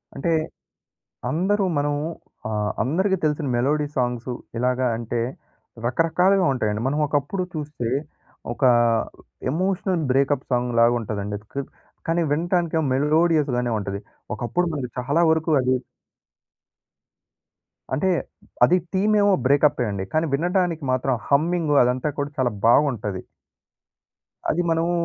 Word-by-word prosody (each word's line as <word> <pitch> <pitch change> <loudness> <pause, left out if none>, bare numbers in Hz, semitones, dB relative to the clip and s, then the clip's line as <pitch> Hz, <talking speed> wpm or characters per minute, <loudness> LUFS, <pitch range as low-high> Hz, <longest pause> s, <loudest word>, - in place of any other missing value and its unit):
అంటే 165 +5 -1 1.0
అందరూ 195 +5 +1
మనం 145 0 0 0.5
ఆహ్, 105 -1 -1
అందరికి 190 - +1
తెలిసిన 150 -1 0
మెలోడీ 145 +4 +1
సాంగ్స్ 125 0 -1 0.3
ఇలాగా 125 +1 +1
అంటే, 120 0 -3 0.7
రకరకాలుగా 180 +8 +2
ఉంటాయండి. 105 -4 -1
మనం 145 +3 0
ఒకప్పుడు 145 +7 -1
చూస్తే 150 -6 -4 0.6
ఒక - - -11 0.9
ఎమోషనల్ 185 +1 0
బ్రేకప్ 140 +1 +2
సాంగులాగా 120 -1 +3
ఉంటదండి. 105 -2 -4 0.2
క్ - - -15 0.5
కాని, 170 +1 +2
వింటానికెమో 165 0 0
మెలోడియస్‌గానే 150 -4 +2
ఉంటది. 100 -1 -4 0.3
ఒకప్పుడు 150 +11 -1
మనకి 125 -4 -4
చాలా 140 +7 +1
వరకు 160 +1 +1
అది 130 0 +2 2.2
అంటే 170 +8 +1 0.5
అది, 180 - +6 0.2
తిమేమో 205 +1 +3
బ్రేకప్పే 140 -2 +3
అండి. 95 -1 -3
కాని, 155 +1 +2
వినడానికి 175 0 0
మాత్రం 130 +1 +1 0.2
హమ్మింగు 155 +1 +2
అదంతా 125 +4 0
కూడా, 145 0 -2
చాలా 125 -2 +1 0.2
బాగుంటది. 115 -8 +2 1.3
అది 175 - +1
మనము 165 +1 +1
145 Hz, 110 wpm, -23 LUFS, 125-170 Hz, 2.2 s, అది